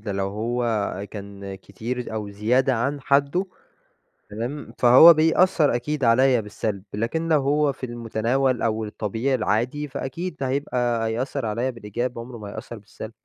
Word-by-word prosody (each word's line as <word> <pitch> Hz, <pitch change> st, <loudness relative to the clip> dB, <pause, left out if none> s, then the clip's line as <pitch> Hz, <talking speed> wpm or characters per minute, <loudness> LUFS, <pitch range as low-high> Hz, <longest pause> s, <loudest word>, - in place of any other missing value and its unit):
ده 105 Hz, -1 st, -4 dB
لو 95 Hz, 0 st, -1 dB
هو 110 Hz, -2 st, -2 dB
كان 100 Hz, -1 st, -8 dB
كتير 110 Hz, +5 st, -6 dB
أو 105 Hz, -2 st, -4 dB
زيادة 125 Hz, +6 st, +2 dB
عن 140 Hz, +5 st, -1 dB
حده، 140 Hz, +8 st, +1 dB, 0.8 s
تمام؟ 120 Hz, +7 st, -5 dB
فهو 130 Hz, +8 st, +9 dB
بيأثر 160 Hz, -2 st, +3 dB
أكيد 145 Hz, +3 st, -2 dB
عليَّ 125 Hz, +1 st, +4 dB
بالسلب، 105 Hz, -1 st, -4 dB
لكن 115 Hz, +10 st, -2 dB
لو 150 Hz, -3 st, +4 dB
هو 145 Hz, +1 st, +2 dB
في 130 Hz, -, -6 dB
المتناول 120 Hz, +2 st, -1 dB
أو 110 Hz, -1 st, 0 dB
الطبيعي 110 Hz, +5 st, -2 dB
العادي 125 Hz, +6 st, -1 dB
فأكيد 140 Hz, +6 st, -5 dB
هيبقى 125 Hz, -4 st, 0 dB
هيأثر 125 Hz, +3 st, -2 dB
عليَّ 115 Hz, +5 st, -1 dB
بالإيجاب 120 Hz, +2 st, -4 dB
عمره 120 Hz, 0 st, -8 dB
ما 105 Hz, -2 st, -8 dB
هيأثر 115 Hz, +2 st, -8 dB
بالسلب. 110 Hz, +1 st, -10 dB
120 Hz, 145 wpm, -24 LUFS, 110-135 Hz, 0.8 s, فهو